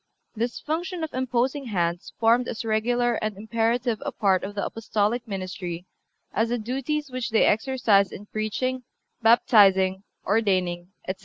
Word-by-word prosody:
This 235 +2 -2
function 340 +3 -3
of 315 - -4
imposing 255 +2 0
hands 175 -5 -2
formed 235 +2 +3
as 230 - -4
regular 240 +2 +1
and 215 -2 -2
imperative 230 +2 0
a - - -3
part 190 -3 +1
of 205 +1 -5
the 200 - -1
Apostolic 225 +2 -1
ministry 185 -3 -5 0.5
as 225 +2 +1
the 240 - 0
duties 270 +5 -3
which 255 -1 -3
they 225 - +4
exercised 220 -4 +3
in 205 - -9
preaching, 215 +5 -2 0.4
baptizing, 195 -5 +5 0.2
ordaining, 185 -5 +1 0.2
etc. 185 0 -3
225 Hz, 145 wpm, -25 LUFS, 200-245 Hz, 0.5 s, baptizing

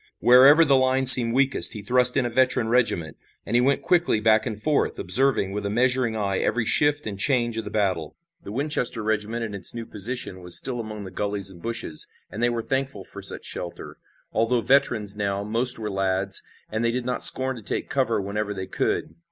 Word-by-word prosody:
Wherever 135 +6 +5
the 140 -2 +3
line 130 0 +1
seemed 120 -2 +8
weakest 130 -10 +4
he 105 - -9
thrust 125 +4 +3
in 130 - 0
a - - -2
veteran 125 -2 +1
regiment, 115 -10 -1 0.3
and - - -4
he 120 - +3
went 135 +2 0
quickly 175 -10 +1
back 110 +1 +1
and 110 -3 -6
forth, 150 +5 -1
observing 130 -7 +4
with 105 +1 -5
a 100 - -3
measuring 125 +1 0
eye 100 -3 -2
every 115 0 -1
shift 145 +5 +2
and 100 -2 -7
change 120 0 0
of 110 - -7
the - - -6
battle. 95 -7 -3 0.3
The - - -10
Winchester 125 -3 -2
regiment 110 +2 -3
in 105 - -8
its 100 +3 -5
new 115 -1 -6
position 105 -3 -5
was 90 -1 +4
still 125 -2 -4
among 110 -2 -8
the 95 - -10
gullies 100 0 -4
and 85 -2 -16
bushes, 115 -9 -4 0.2
and 110 - -7
they 120 - +2
were 115 -1 -4
thankful 135 -5 -4
for - - -12
such - - -2
shelter. 85 - -8 0.4
Although 115 +2 0
veterans 115 -6 0
now, 100 -1 -3
most 115 +4 0
were 105 -2 -6
lads, 95 0 -1 0.3
and 110 +2 -3
they 115 - +1
did 120 +1 -4
not 125 0 -3
scorn 130 0 +6
to - - -10
take - - -2
cover - - -1
whenever 105 +1 -5
they 95 -1 -6
could. - - -3
115 Hz, 210 wpm, -23 LUFS, 100-125 Hz, 0.4 s, seemed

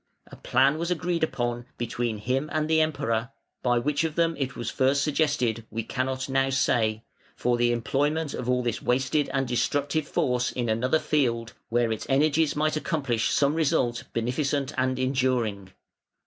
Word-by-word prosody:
A - - -9
plan 135 +5 +2
was 170 +1 -2
agreed 175 -1 -1
upon 120 -4 -2
between 120 -1 -2
him 130 +7 -1
and 155 0 0
the 160 0 +3
Emperor 125 -6 0 0.3
(by 120 -1 +2
which 145 +5 0
of 160 -1 -2
them 165 -1 +2
it 135 -2 -2
was 120 -2 -4
first 135 +2 +2
suggested 140 -7 0
we 115 +1 -3
cannot 130 +2 -2
now 135 0 +1
say) 115 -4 +1 0.3
for 125 0 +1
the 120 0 +2
employment 145 +6 0
of 125 0 -4
all 125 0 +2
this 120 -2 -2
wasted 130 +4 +1
and 135 -1 0
destructive 145 +5 0
force 125 -1 0
in 120 -2 -2
another 125 +7 +2
field, 115 -7 0 0.2
where 120 0 +1
its 110 - -4
energies 150 +3 +3
might 155 +1 +1
accomplish 135 - 0
some 140 0 +2
result 150 -7 +1
beneficent 140 +4 -1
and 130 0 0
enduring. 125 -7 0
130 Hz, 165 wpm, -26 LUFS, 120-150 Hz, 0.3 s, the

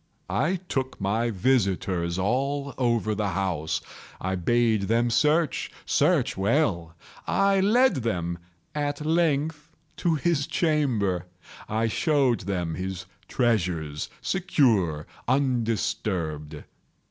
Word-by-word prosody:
I 155 - +1
took 130 -4 -2
my 110 +4 0
visitors 95 -6 0
all 140 +8 -1
over 115 -3 +1
the 105 0 -1
house. 85 -5 -1 0.4
I 95 +1 -2
bade 110 +2 +2
them 115 +1 +2
search—search 150 +1 +1
well. 95 - 0 0.3
I 195 0 +3
led 235 - +4
them, 85 -8 -2 0.3
at 145 0 -2
length, 155 -1 +1 0.3
to 170 -2 +1
his 150 -2 0
chamber. 115 - 0 0.4
I 110 +1 +1
showed 125 +1 +2
them 90 -4 -1
his 95 +2 -4 0.2
treasures, 85 - 0
secure, 115 - +1 0.2
undisturbed. 105 - -1
115 Hz, 100 wpm, -26 LUFS, 95-145 Hz, 0.4 s, led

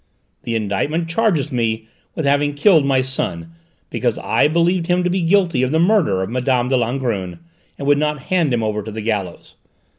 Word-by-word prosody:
The 115 - -3
indictment 115 - -1
charges 170 - 0
me 110 -3 -1 0.3
with 160 - -2
having 145 +1 +1
killed 160 +1 +4
my 130 -1 +2
son 85 -11 -4 0.4
because - - -1
I - - +2
believed 170 +2 +1
him 180 0 +1
to 180 - 0
be 185 0 0
guilty 170 -5 +2
of 130 - +1
the 155 - +1
murder 170 - +2
of 95 - -5
Mme. 125 0 0
de 135 - +2
Langrune 115 -7 -2 0.4
and 140 - -5
would 145 0 +4
not 150 -2 -1
hand 170 -5 0
him 120 -2 0
over 105 -1 -1
to 110 - -8
the 110 +1 -6
gallows. 105 -5 -4
135 Hz, 190 wpm, -19 LUFS, 110-165 Hz, 0.4 s, killed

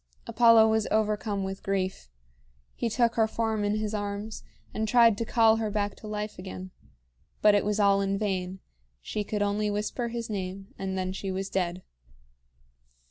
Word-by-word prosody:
Apollo 230 -2 +6
was 220 -1 +1
overcome 210 -2 0
with 190 0 -5
grief. 190 - -2 0.6
He 235 - -2
took 230 +1 +2
her 225 -1 +2
form 220 -1 -1
in 205 +1 +1
his 215 0 -2
arms, 205 +1 -4 0.3
and 220 0 -1
tried 230 -1 +6
to 230 - -1
call 225 -1 +4
her 220 -1 -1
back 205 -1 -1
to 215 - -10
life 210 -1 -4
again. 185 0 -7 0.7
But 210 -1 +7
it 205 - +3
was 210 +1 -1
all 200 -1 +4
in 195 0 0
vain. 190 -2 -2 0.4
She 210 - -3
could 205 0 -1
only 205 +1 0
whisper 210 +4 -2
his 235 0 -4
name, 195 -1 -5
and 190 -1 -4
then 185 0 -2
she 195 0 -4
was 190 +1 -4
dead. 180 -1 -1
210 Hz, 175 wpm, -28 LUFS, 195-220 Hz, 0.7 s, But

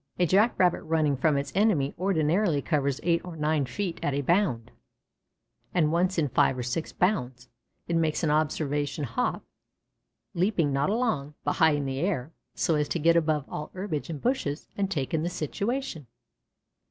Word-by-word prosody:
A 180 - +3
Jack 205 +7 +3
rabbit 180 -2 +3
running 155 -3 +1
from 150 +2 +2
its 140 - -3
enemy 185 -9 +2
ordinarily 175 -1 +1
covers 140 -2 0
eight 170 -1 +2
or 180 -2 -8
nine 150 -2 +1
feet 180 +6 -3
at 145 - 0
a 140 - -1
bound, 135 - +1 1.0
and 155 -4 +3
once 180 +3 +1
in 155 -3 +2
five 130 0 +2
or 125 - -3
six 125 +7 -3
bounds, 125 - -1 0.4
it 170 - 0
makes 160 0 +1
an 155 - +2
observation 150 -1 0
hop, 115 -4 -1 0.9
leaping 170 -5 +1
not 140 +5 +1
along, 180 - -1
but - - 0
high 160 -2 +5
in 145 -1 -1
the 135 0 -3
air, 165 -5 -1 0.2
so 165 - +1
as 150 -1 0
to - - 0
get 165 +1 +4
above 155 -3 +1
all 150 - -6
herbage 185 -6 -4
and 155 -4 -5
bushes 200 - -1
and 200 -1 -1
take 145 -7 -2
in 160 - +1
the 170 - -1
situation. 200 - -3
155 Hz, 175 wpm, -27 LUFS, 145-180 Hz, 1.0 s, high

